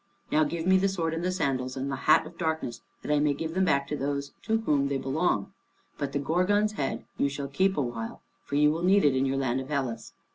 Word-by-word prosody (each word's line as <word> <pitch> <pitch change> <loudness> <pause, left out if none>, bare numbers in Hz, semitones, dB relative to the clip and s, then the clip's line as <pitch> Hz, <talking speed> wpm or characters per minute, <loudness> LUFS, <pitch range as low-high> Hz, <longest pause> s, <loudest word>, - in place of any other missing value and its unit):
Now 155 - +4
give 165 +2 -3
me 190 0 +5
the 195 +1 +2
sword 165 -4 -1
and 165 +1 -3
the 180 - +1
sandals, 130 -7 -1
and 135 +1 -2
the - - -1
hat 155 - +4
of 165 +2 -11
darkness, 160 -8 -2 0.2
that - - -2
I 150 - +3
may 145 -1 +2
give 160 +2 -4
them 190 +1 +2
back 140 -5 +2
to 150 - -1
those 140 0 -2
to 220 +1 +1
whom 145 -9 +2
they 140 -1 0
belong. 135 - 0 0.5
But 140 -1 -2
the 140 - -1
Gorgon's 185 +9 +2
head 145 -10 -3
you 140 - +3
shall 140 0 -4
keep 190 +8 +1
a - - +2
while, 115 -2 -5 0.2
for 140 - -5
you 150 +1 +5
will 165 +2 -2
need 190 +1 +4
it 140 -2 +4
in 130 +1 +2
your 135 0 0
land 130 -1 0
of 130 - -9
Hellas." 130 -6 -3
145 Hz, 255 wpm, -28 LUFS, 135-170 Hz, 0.5 s, me